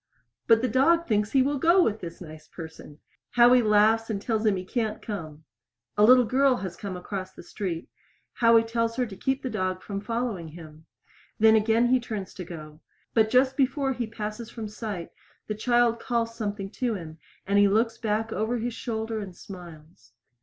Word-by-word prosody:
But 225 +1 +5
the - - +3
dog 325 +8 +3
thinks 210 -2 +1
he 265 -2 +5
will 285 +1 -1
go 345 +5 +5
with 220 -5 0
this 170 0 -8
nice 155 -2 -11
person! 160 -3 -10 0.4
Howie 245 +1 +6
laughs 220 +1 +3
and 210 -3 -2
tells 220 +1 -1
him 205 - +3
he 185 0 -5
can't 220 +1 -2
come. 160 -7 -7 0.5
A 210 - +3
little 250 +2 +7
girl 265 +3 +3
has 190 -7 -5
come 195 -3 -6
across 185 0 -6
the - - -12
street. 175 -2 -5 0.5
Howie 230 -1 +5
tells 230 0 -1
her 250 0 0
to 210 -4 -9
keep 265 +7 -2
the 260 - -2
dog 185 0 -2
from 200 -1 -5
following 230 -6 -3
him. 155 -1 -13 0.5
Then 220 0 +6
again 220 +2 +3
he 255 0 +4
turns 215 -5 -6
to 185 - -7
go. 155 -2 -10 0.3
But 220 -1 +3
just 260 +2 +3
before 270 0 +1
he 240 -2 -3
passes 220 +1 -6
from 225 -2 -6
sight 210 -4 -6 0.3
the 215 - -3
child 240 +1 +2
calls 230 -1 -1
something 205 -3 -4
to 245 -3 -1
him, 160 -4 -9 0.3
and 200 +1 +2
he 205 - +6
looks 225 +3 +1
back 220 +1 -1
over 220 +3 -1
his 235 +1 -3
shoulder 220 -1 -3
and 190 -4 -7
smiles. 160 - -12
220 Hz, 190 wpm, -26 LUFS, 185-235 Hz, 0.5 s, little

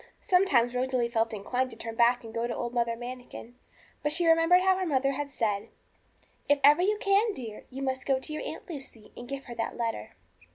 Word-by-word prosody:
Sometimes 280 -11 +3
Rosalie 250 -1 0
felt 225 -1 +1
inclined 245 +5 -2
to 230 - -11
turn 225 0 -6
back 240 +2 +3
and 225 -1 -10
go 230 +1 -1
to 235 - -3
old 240 0 -4
Mother 235 -1 0
Manikin. 245 0 -9 0.5
But 295 - +1
she 340 +3 +1
remembered 330 +2 +5
how 380 0 +4
her 375 - -1
mother 275 -2 +2
had 285 +1 -4
said 215 -5 -1 0.8
'If 290 0 +4
ever 295 +4 +7
you 415 +3 +2
can, 405 +2 +2
dear, 225 -5 -8
you 270 +1 -6
must 260 -1 -3
go 270 -1 +3
to 305 +4 -6
your 305 - -4
Aunt - - -7
Lucy, 270 - -9
and 240 0 -10
give 275 0 -5
her 240 - -8
that 230 -1 -4
letter.' 230 - -3
255 Hz, 215 wpm, -28 LUFS, 235-295 Hz, 0.8 s, ever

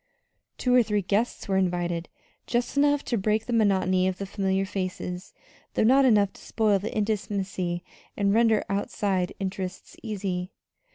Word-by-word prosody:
Two 250 - +1
or 250 - +7
three 210 -3 0
guests 210 +7 -1
were 190 -1 +1
invited 175 -2 -1 0.4
just 240 +2 -1
enough 290 0 +3
to 235 - 0
break 215 +2 +1
the 245 - -3
monotony 190 -4 +3
of 185 -1 -1
the 200 - -4
familiar 195 0 0
faces, 185 -1 -4 0.4
though - - +3
not 265 +4 +5
enough 205 -5 +4
to - - -15
spoil 210 -3 +1
the 205 +4 -4
intimacy 195 -4 -2 0.3
and 200 -1 +2
render 225 -1 +4
outside 195 -2 -1
interests 190 -1 -5
easy. 190 -5 -3
200 Hz, 155 wpm, -26 LUFS, 185-220 Hz, 0.4 s, or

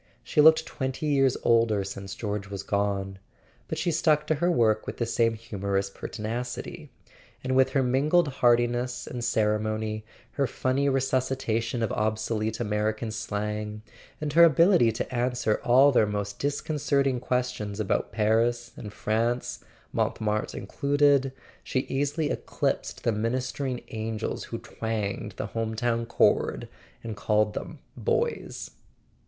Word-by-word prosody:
She 150 - +3
looked 160 +1 +7
twenty 130 +2 -4
years 135 -3 +3
older 115 -3 +3
since 95 0 -7
George 105 -2 -4
was 100 -1 -5
gone, 100 -1 -1 0.5
but - - -3
she 175 - 0
stuck 150 -1 +2
to 155 - +2
her 175 - +3
work 110 -8 +2
with - - -5
the 120 - 0
same 115 0 +1
humorous 100 -3 -2
per¬ - - -7
tinacity; 120 +3 -5 0.5
and 130 0 0
with 130 0 +4
her 135 - +3
mingled 145 +7 +3
heartiness 120 -1 +1
and 125 - -6
cere¬ 105 -2 +1
mony, 110 0 -3 0.3
her 140 -2 0
funny 130 +4 0
resuscitation 130 -3 0
of 110 - -1
obsolete 110 0 -1
American 110 0 -1
slang, 105 -1 -4 0.4
and 150 -1 -3
her 170 +2 +8
ability 165 - +5
to 115 - -4
answer 120 -3 0
all 130 +4 +6
their 110 -5 +4
most 100 -1 -3
discon¬ 145 +2 -2
certing 135 -3 +1
questions 125 -5 -2
about 105 - 0
Paris 115 +2 +1
and 105 - -8
France 115 +4 -1 0.3
(Montmartre 105 0 -1
included), 140 +4 +2 0.3
she 130 - 0
easily 145 +4 -1
eclipsed - - -2
the 115 - +2
ministering 125 +4 -2
angels 110 0 -3
who - - -5
twanged 110 -3 -4
the - - -2
home 115 -1 -2
town 115 0 0
chord - - +2 0.4
and 115 -2 -5
called 105 0 +1
them - - -6 0.2
"boys." - - -2
115 Hz, 140 wpm, -27 LUFS, 105-130 Hz, 0.5 s, her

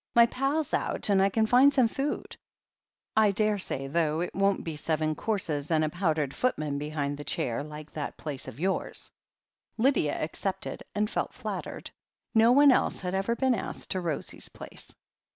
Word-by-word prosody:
"My 235 0 +8
pal's 275 +5 -1
out - - +1
and 195 -1 +4
I 195 - +4
can 220 +3 +2
find 255 +5 +6
some 260 -4 +4
food, 275 +5 -3 0.8
I 220 -1 +5
daresay, 200 -9 0
though 155 +2 0
it 175 - -3
won't 195 +1 +1
be 165 -2 -4
seven 155 0 0
courses 155 -6 -2
and 160 -2 +3
a - - -1
pow 175 +1 0
dered 145 -3 -2
footman 155 - -1
behind 145 -1 -3
the - - -5
chair, 125 -2 -1
like 150 0 -9
that 150 -2 -5
place 140 -3 -4
of - - -9
yours." 190 +3 -1 0.7
Lydia 235 - +2
accepted, 185 +5 -3
and 210 +1 +1
felt - - -3
flattered. - - -5 0.4
No 225 +1 +6
one 285 +2 +7
else - - +1
had 180 -1 -3
ever 195 +5 0
been 260 +1 +2
asked 220 - -4
to 185 - 0
Rosie's 165 -5 -3
place. - - -8
185 Hz, 175 wpm, -28 LUFS, 150-225 Hz, 0.8 s, My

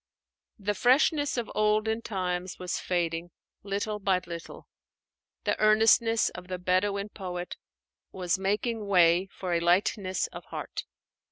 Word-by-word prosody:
The 205 -1 -1
freshness 280 - +3
of 240 - -3
olden 215 +1 +1
times 185 -3 -3
was 180 -1 -3
fading 170 -1 -1 0.3
little 205 +1 -3
by 195 -2 +2
little; 170 0 -8 0.8
the - - +1
earnestness 225 +1 +4
of 180 0 -10
the 185 0 -3
Bedouin 200 +3 0
poet 180 -3 -6 0.6
was 185 0 -1
making 210 +3 -1
way 180 -1 +4
for 185 -2 -4
a 170 - +2
lightness 185 +2 +1
of - - -9
heart. - - -6
195 Hz, 125 wpm, -28 LUFS, 180-215 Hz, 0.8 s, earnestness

